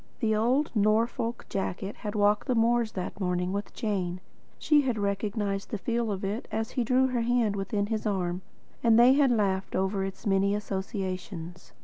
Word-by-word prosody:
The 220 Hz, -3 st, +1 dB
old 250 Hz, +7 st, +2 dB
Norfolk 225 Hz, +2 st, +1 dB
jacket 195 Hz, +1 st, -3 dB
had 210 Hz, 0 st, -5 dB
walked 205 Hz, +2 st, +2 dB
the 255 Hz, -, +1 dB
moors 230 Hz, 0 st, +2 dB
that 185 Hz, 0 st, -5 dB
morning 180 Hz, -1 st, -1 dB
with 200 Hz, +1 st, -3 dB
Jane. 185 Hz, -5 st, -2 dB, 0.4 s
She 300 Hz, -1 st, +4 dB
had 250 Hz, -5 st, -1 dB
recognised 200 Hz, 0 st, -2 dB
the 215 Hz, -, -2 dB
feel 235 Hz, +2 st, -1 dB
of 195 Hz, 0 st, -3 dB
it 205 Hz, +4 st, -3 dB
as 220 Hz, 0 st, -2 dB
he 250 Hz, -, 0 dB
drew 255 Hz, +3 st, +3 dB
her 245 Hz, -2 st, 0 dB
hand 230 Hz, -3 st, +1 dB
within 200 Hz, +1 st, -1 dB
his 220 Hz, 0 st, -2 dB
arm, 180 Hz, -3 st, -1 dB, 0.4 s
and 230 Hz, -1 st, +5 dB
they 245 Hz, +2 st, +7 dB
had 280 Hz, -1 st, +4 dB
laughed 195 Hz, -5 st, 0 dB
over 190 Hz, +1 st, 0 dB
its 195 Hz, +3 st, -6 dB
many 200 Hz, 0 st, +2 dB
associations. 190 Hz, -4 st, -5 dB
210 Hz, 180 wpm, -28 LUFS, 195-230 Hz, 0.4 s, they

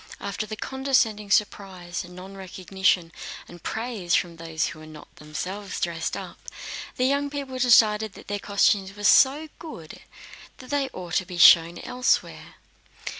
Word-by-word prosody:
After 200 Hz, +2 st, -4 dB
the 215 Hz, -, -5 dB
condescending 255 Hz, -5 st, 0 dB
surprise, 190 Hz, -4 st, -1 dB
nonrecognition, 185 Hz, -1 st, -2 dB, 0.4 s
and 175 Hz, -1 st, -13 dB
praise, 220 Hz, -6 st, -2 dB
from 170 Hz, -3 st, -1 dB
those 165 Hz, -1 st, -2 dB
who 155 Hz, -, -6 dB
were 155 Hz, -, -12 dB
not 155 Hz, -1 st, -13 dB
themselves 180 Hz, +7 st, -5 dB
dressed 165 Hz, -1 st, -2 dB
up, -, -, -9 dB, 0.6 s
the 255 Hz, -, +1 dB
young 280 Hz, +2 st, +1 dB
people 275 Hz, -3 st, -5 dB
decided 220 Hz, -4 st, +4 dB
that -, -, -14 dB
their 205 Hz, 0 st, -3 dB
costumes 200 Hz, -1 st, +1 dB
were 205 Hz, -, -9 dB
so 280 Hz, +9 st, +5 dB
good 175 Hz, -, -10 dB, 0.6 s
that 255 Hz, -, -11 dB
they 280 Hz, -2 st, 0 dB
ought 180 Hz, -7 st, -8 dB
to 185 Hz, -, -1 dB
be 180 Hz, -2 st, -7 dB
shown 170 Hz, +1 st, +7 dB
elsewhere. 250 Hz, +1 st, -1 dB
195 Hz, 145 wpm, -25 LUFS, 175-245 Hz, 0.6 s, shown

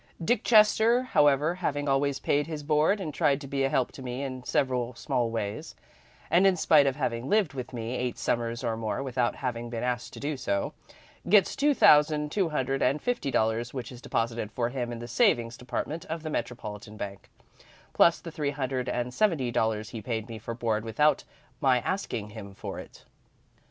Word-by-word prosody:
"Dick 230 Hz, +9 st, +1 dB
Chester, 225 Hz, +2 st, +5 dB
however, 150 Hz, -, +3 dB
having 145 Hz, -5 st, -2 dB
always 135 Hz, 0 st, +1 dB
paid 145 Hz, +2 st, +1 dB
his 155 Hz, -2 st, -5 dB
board, 155 Hz, +7 st, +2 dB
and 155 Hz, -6 st, -4 dB
tried 140 Hz, 0 st, +2 dB
to 145 Hz, -, -9 dB
be 135 Hz, 0 st, -1 dB
a 135 Hz, -, +2 dB
help 135 Hz, -3 st, +1 dB
to -, -, -11 dB
me 125 Hz, +1 st, -4 dB
in 130 Hz, -2 st, -5 dB
several 125 Hz, -4 st, 0 dB
small 125 Hz, -3 st, -1 dB
ways, 105 Hz, -3 st, -4 dB, 0.6 s
and 180 Hz, +4 st, +5 dB
in 190 Hz, -2 st, +3 dB
spite 150 Hz, -3 st, +5 dB
of 135 Hz, -, +1 dB
having 125 Hz, -3 st, -2 dB
lived 205 Hz, -9 st, +2 dB
with 130 Hz, -2 st, -6 dB
me 120 Hz, 0 st, -4 dB
eight 125 Hz, -1 st, -2 dB
Summers 115 Hz, 0 st, -1 dB
or 115 Hz, -2 st, 0 dB
more 110 Hz, +4 st, -3 dB
without 125 Hz, -2 st, 0 dB
having 120 Hz, -2 st, -4 dB
been 115 Hz, 0 st, -4 dB
asked 125 Hz, -1 st, -2 dB
to -, -, -8 dB
do 145 Hz, 0 st, -3 dB
so, 100 Hz, -5 st, -1 dB, 0.6 s
gets 200 Hz, -1 st, +5 dB
two 290 Hz, 0 st, +2 dB
thousand 150 Hz, -3 st, +5 dB
two 190 Hz, -3 st, +1 dB
hundred 135 Hz, -3 st, -1 dB
and 135 Hz, +4 st, +2 dB
fifty 245 Hz, -, -1 dB
dollars 115 Hz, +1 st, 0 dB
which 125 Hz, -2 st, -5 dB
is 125 Hz, -1 st, -11 dB
deposited 115 Hz, -3 st, -2 dB
for 120 Hz, +1 st, -1 dB
him 120 Hz, -2 st, -3 dB
in 120 Hz, -, -5 dB
the 120 Hz, +1 st, -7 dB
savings 120 Hz, 0 st, +2 dB
department 135 Hz, +6 st, -4 dB
of 160 Hz, 0 st, -5 dB
the 155 Hz, -, -4 dB
Metropolitan 105 Hz, -5 st, -5 dB
Bank, 100 Hz, -1 st, -7 dB, 0.6 s
plus 170 Hz, -, +5 dB
the 165 Hz, -, -8 dB
three 150 Hz, -2 st, -2 dB
hundred 130 Hz, -2 st, -2 dB
and 125 Hz, 0 st, -2 dB
seventy 155 Hz, -, +1 dB
dollars 110 Hz, -1 st, 0 dB
he 115 Hz, -, -6 dB
paid 110 Hz, 0 st, -3 dB
me 115 Hz, -2 st, -7 dB
for 115 Hz, +1 st, -6 dB
board 110 Hz, -2 st, -1 dB
without 140 Hz, +6 st, +2 dB, 0.4 s
my 130 Hz, -4 st, +4 dB
asking 115 Hz, -, -3 dB
him 100 Hz, -3 st, -9 dB
for -, -, -6 dB
it. -, -, -12 dB
130 Hz, 195 wpm, -28 LUFS, 115-150 Hz, 0.6 s, Chester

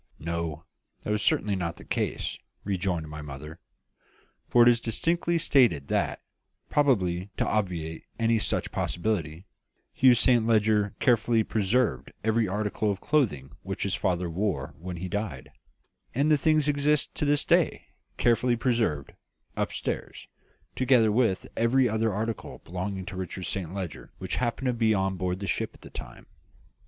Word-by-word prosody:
"No; 85 Hz, -1 st, -4 dB, 0.4 s
that -, -, -2 dB
was 105 Hz, 0 st, +1 dB
certainly 105 Hz, -1 st, +2 dB
not 85 Hz, -2 st, -2 dB
the -, -, -12 dB
case," -, -, -2 dB, 0.2 s
rejoined 90 Hz, -4 st, -1 dB
my 75 Hz, 0 st, -7 dB
mother; 75 Hz, +3 st, -9 dB, 0.9 s
"for 120 Hz, -, +6 dB
it -, -, +5 dB
is 120 Hz, -1 st, +5 dB
distinctly 170 Hz, +9 st, 0 dB
stated 120 Hz, -, +3 dB
that -, -, -1 dB, 0.5 s
probably 95 Hz, -10 st, +2 dB
to -, -, +1 dB
obviate 85 Hz, -6 st, -2 dB
any 115 Hz, -1 st, +2 dB
such 100 Hz, -, -1 dB
possibility 85 Hz, -3 st, -2 dB, 0.5 s
Hugh 130 Hz, -1 st, +6 dB
Saint 120 Hz, -1 st, +4 dB
Leger 105 Hz, -2 st, +2 dB
carefully 115 Hz, -2 st, +3 dB
preserved 110 Hz, +3 st, 0 dB
every 110 Hz, 0 st, +2 dB
article 105 Hz, +2 st, -1 dB
of 100 Hz, -1 st, -1 dB
clothing 100 Hz, -, 0 dB
which -, -, -4 dB
his -, -, -1 dB
father 90 Hz, -1 st, 0 dB
wore 95 Hz, +3 st, -2 dB
when 90 Hz, +1 st, -6 dB
he 90 Hz, +2 st, -4 dB
died; 90 Hz, -8 st, -4 dB, 0.6 s
and 145 Hz, +4 st, +2 dB
the -, -, +7 dB
things 155 Hz, 0 st, +3 dB
exist 145 Hz, +1 st, +1 dB
to -, -, -3 dB
this 145 Hz, 0 st, +2 dB
day, -, -, +2 dB, 0.3 s
carefully 120 Hz, +1 st, +3 dB
preserved, 115 Hz, -, 0 dB, 0.4 s
upstairs, -, -, -3 dB, 0.5 s
together 125 Hz, -4 st, +4 dB
with 110 Hz, -4 st, +1 dB
every 125 Hz, +3 st, +3 dB
other 110 Hz, 0 st, +1 dB
article 110 Hz, +2 st, -4 dB
belonging 95 Hz, +2 st, -4 dB
to 95 Hz, -, -7 dB
Richard 95 Hz, 0 st, -5 dB
Saint 90 Hz, -1 st, -3 dB
Leger 95 Hz, -5 st, -6 dB
which -, -, -4 dB
happened 125 Hz, +2 st, -1 dB
to 125 Hz, -, +2 dB
be 115 Hz, -2 st, +2 dB
on 95 Hz, 0 st, 0 dB
board 90 Hz, 0 st, -2 dB
the 100 Hz, -, -4 dB
ship -, -, -2 dB
at -, -, -19 dB
that -, -, -13 dB
time." -, -, -9 dB
105 Hz, 155 wpm, -27 LUFS, 90-120 Hz, 0.9 s, the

